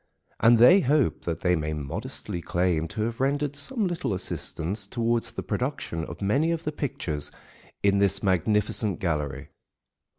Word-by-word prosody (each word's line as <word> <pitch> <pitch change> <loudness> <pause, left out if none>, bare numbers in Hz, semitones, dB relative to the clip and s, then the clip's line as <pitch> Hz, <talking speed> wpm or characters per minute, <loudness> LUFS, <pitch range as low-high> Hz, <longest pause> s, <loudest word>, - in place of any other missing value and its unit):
And 115 +2 +6
they 125 - +8
hope 145 -4 +1
that 85 -2 -3
they 90 -1 +3
may 75 -1 -2
modestly 75 +3 -5
claim 85 -2 0
to 110 +2 -3
have 115 +1 -3
rendered 140 +1 0
some 215 - -1
little 175 - -1
assistance 95 +2 -2
towards 115 0 0
the - - -5
production 125 - -3
of 85 +4 -8
many 140 +12 +2
of 165 -1 -1
the 150 - -2
pictures 80 - -3 0.5
in 100 0 +4
this 100 -1 +2
magnificent 100 +1 +2
gallery. 75 -6 -2
105 Hz, 155 wpm, -26 LUFS, 85-135 Hz, 0.5 s, they